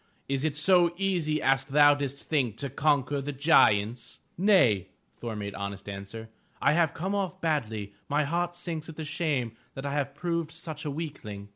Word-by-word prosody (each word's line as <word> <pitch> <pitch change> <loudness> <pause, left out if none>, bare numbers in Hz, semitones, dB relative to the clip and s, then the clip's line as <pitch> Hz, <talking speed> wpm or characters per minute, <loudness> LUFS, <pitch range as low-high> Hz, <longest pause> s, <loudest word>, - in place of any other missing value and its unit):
Is 135 0 -1
it 155 -2 0
so 175 +2 +4
easy 175 -6 0
as 135 -1 +3
thou 145 +2 +6
didst 140 -1 -4
think 130 -8 0
to 140 -2 -4
conquer 145 -1 +1
the 145 +2 -4
giants?" 120 -6 +3 0.2
"Nay," 170 - +4 0.3
Thor 115 -2 -4
made 100 -1 -5
honest 100 0 -6
answer, 100 +3 -7 0.3
"I - - +3
have 165 -2 +2
come 190 +4 -2
off 195 -4 -2
badly. 110 -11 -2 0.2
My 150 +1 +2
heart 175 +4 -1
sinks 170 -3 -5
with 160 -1 -6
shame 140 -7 -1 0.2
that 135 - -6
I 140 - -2
have 140 -1 -2
proved 170 0 -2
such 160 -2 -7
a - - -1
weakling!" 140 -10 -6
145 Hz, 175 wpm, -28 LUFS, 120-165 Hz, 0.3 s, thou